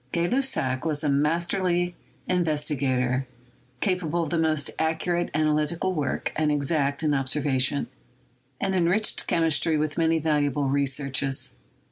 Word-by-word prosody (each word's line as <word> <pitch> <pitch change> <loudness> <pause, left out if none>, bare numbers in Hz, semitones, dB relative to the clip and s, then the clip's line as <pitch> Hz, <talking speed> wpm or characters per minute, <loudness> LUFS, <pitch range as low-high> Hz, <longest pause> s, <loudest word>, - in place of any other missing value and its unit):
Gay 170 0 0
Lussac 175 - 0
was 155 -1 0
a 150 - +1
masterly 175 +4 +1 0.3
investigator, 140 -7 0 0.5
capable 175 -3 0
of 160 - -5
the 170 - +1
most 155 -3 0
accurate 165 +2 0
analytical 155 +4 +1
work 150 -5 -2
and 155 -1 +1
exact 145 0 0
in 150 -2 +2
observation, 135 0 +1 0.7
and 195 -1 -1
enriched 185 +4 +1
chemistry 165 -1 +2
with 150 +1 -2
many 165 0 +3
valuable 145 -3 0
researches. 135 0 +1
155 Hz, 120 wpm, -25 LUFS, 140-170 Hz, 0.7 s, many